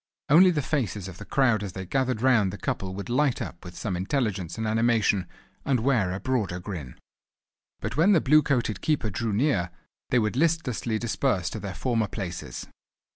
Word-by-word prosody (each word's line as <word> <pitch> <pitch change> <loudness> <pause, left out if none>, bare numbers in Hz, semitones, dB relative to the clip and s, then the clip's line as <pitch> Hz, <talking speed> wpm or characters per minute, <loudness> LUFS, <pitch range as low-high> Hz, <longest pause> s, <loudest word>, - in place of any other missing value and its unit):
Only 175 +6 +7
the 155 -5 0
faces 110 - -2
of 95 -2 -10
the 105 - -8
crowd 120 -5 +2
as 100 -4 -5
they 95 0 -6
gathered 130 +2 -1
round 115 -7 +4
the 100 - -7
couple 95 -1 -3
would 100 - -6
light 130 +2 +1
up 85 - -6
with 90 -1 -10
some 100 -5 -2
intelligence 95 - -2
and 110 - -2
animation, 110 -3 +2 0.4
and 135 -3 +1
wear 115 -8 +2
a 95 - -3
broader 110 -9 -1
grin. 85 -9 -7 0.8
But - - -4
when 185 +6 +5
the 170 - +5
blue 155 +2 +5
coated 120 -9 -1
keeper 140 -9 0
drew 115 +4 -2
near, 105 - +1 0.4
they 125 - +3
would 110 -1 +1
listlessly 135 -7 0
disperse 110 -5 0
to - - -5
their 100 -2 -6
former 115 -4 0
places. 95 -3 -6
110 Hz, 185 wpm, -26 LUFS, 95-130 Hz, 0.8 s, Only